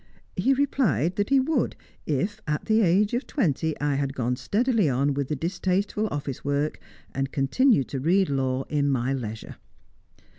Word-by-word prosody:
He 270 Hz, +1 st, +2 dB
replied 205 Hz, -, +1 dB
that 205 Hz, 0 st, 0 dB
he 275 Hz, 0 st, +5 dB
would, 270 Hz, -1 st, 0 dB, 0.3 s
if, 190 Hz, +9 st, -1 dB
at 150 Hz, 0 st, -2 dB
the 220 Hz, 0 st, +3 dB
age 200 Hz, +3 st, +3 dB
of 245 Hz, +3 st, -1 dB
twenty, 160 Hz, -, 0 dB
I 145 Hz, 0 st, 0 dB
had 140 Hz, 0 st, -2 dB
gone 125 Hz, -1 st, 0 dB
steadily 220 Hz, -, +1 dB
on 140 Hz, +3 st, +1 dB
with 140 Hz, -1 st, -2 dB
the 150 Hz, -, -2 dB
distasteful 185 Hz, +6 st, -1 dB
office 140 Hz, -6 st, -5 dB
work, 145 Hz, +2 st, -1 dB, 0.3 s
and 135 Hz, 0 st, -1 dB
had -, -, -29 dB
continued 140 Hz, -, +3 dB
to 135 Hz, -, -3 dB
read 180 Hz, +7 st, +3 dB
law 135 Hz, -1 st, -1 dB
in 145 Hz, -1 st, 0 dB
my 130 Hz, 0 st, 0 dB
leisure. 110 Hz, -4 st, -6 dB
150 Hz, 175 wpm, -25 LUFS, 135-210 Hz, 0.3 s, he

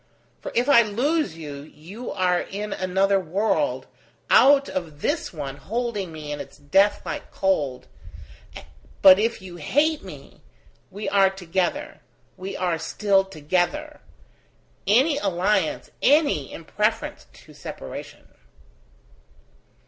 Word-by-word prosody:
For -, -, -6 dB
if 245 Hz, +3 st, +2 dB
I 280 Hz, -5 st, +7 dB
lose 240 Hz, -, 0 dB
you, 150 Hz, -3 st, -7 dB
you 170 Hz, -, -10 dB
are 180 Hz, -2 st, +1 dB
in 205 Hz, +1 st, -5 dB
another 190 Hz, +1 st, +1 dB
world, 205 Hz, -, 0 dB, 0.5 s
out 280 Hz, 0 st, +6 dB
of 160 Hz, -5 st, -5 dB
this 305 Hz, +2 st, -1 dB
one 140 Hz, -5 st, -6 dB
holding 220 Hz, -3 st, -3 dB
me 155 Hz, -2 st, -7 dB
in 145 Hz, -, -4 dB
its -, -, -9 dB
death 190 Hz, +8 st, +2 dB
like -, -, -5 dB
cold; 150 Hz, -10 st, -1 dB, 1.2 s
but 190 Hz, 0 st, +9 dB
if 225 Hz, -2 st, -1 dB
you 180 Hz, -2 st, -9 dB
hate 290 Hz, -, +1 dB
me -, -, -12 dB, 0.5 s
we 205 Hz, +1 st, -6 dB
are 195 Hz, -1 st, +4 dB
together, 190 Hz, -, -3 dB, 0.3 s
we 190 Hz, +1 st, -6 dB
are 175 Hz, -3 st, -1 dB
still 195 Hz, +4 st, +2 dB
together. 190 Hz, -, -2 dB, 0.9 s
Any 270 Hz, +8 st, +4 dB
alliance, 190 Hz, -, 0 dB
any, 285 Hz, -, +3 dB
in 165 Hz, -, -9 dB
preference 210 Hz, +6 st, -2 dB
to -, -, -17 dB
separation!" -, -, -9 dB
195 Hz, 120 wpm, -24 LUFS, 170-235 Hz, 1.2 s, but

